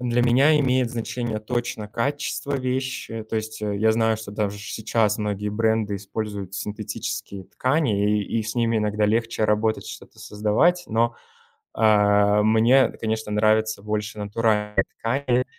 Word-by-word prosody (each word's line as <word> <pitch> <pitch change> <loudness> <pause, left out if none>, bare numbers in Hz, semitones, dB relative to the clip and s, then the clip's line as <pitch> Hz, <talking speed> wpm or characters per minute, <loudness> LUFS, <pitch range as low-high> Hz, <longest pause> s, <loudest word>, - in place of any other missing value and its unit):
Для 120 -1 +1
меня 135 +6 +4
имеет 130 -3 +1
значение 120 -1 -3
точно 110 -1 -3
качество 140 +5 -2
вещи, 130 -3 -3
то 110 +1 -4
есть, 110 0 -5
э, 105 -1 -1
я 110 +1 +3
знаю, 110 -1 +1
что 110 -2 -8
даже 105 -1 -2
сейчас 110 +1 0
многие 105 -1 -2
бренды 110 -1 0
используют 100 -1 -5
синтетические 105 -2 -5
ткани, 130 - 0
и, - - -1
и, 115 - -2
и - - -2
с 110 +1 -5
ними 115 -2 +1
иногда 105 0 +1
легче 115 +1 0
работать, 105 +1 +1
что-то - - -11
создавать. 110 +13 +1
Но, 115 +1 +1 0.6
э, 105 -1 +4
мне, 115 +5 +4
конечно, 110 -1 -2
нравится 110 0 +2
больше 105 0 -3
натуральные 105 -1 0
ткани. 125 +1 0
110 Hz, 145 wpm, -23 LUFS, 105-120 Hz, 0.6 s, меня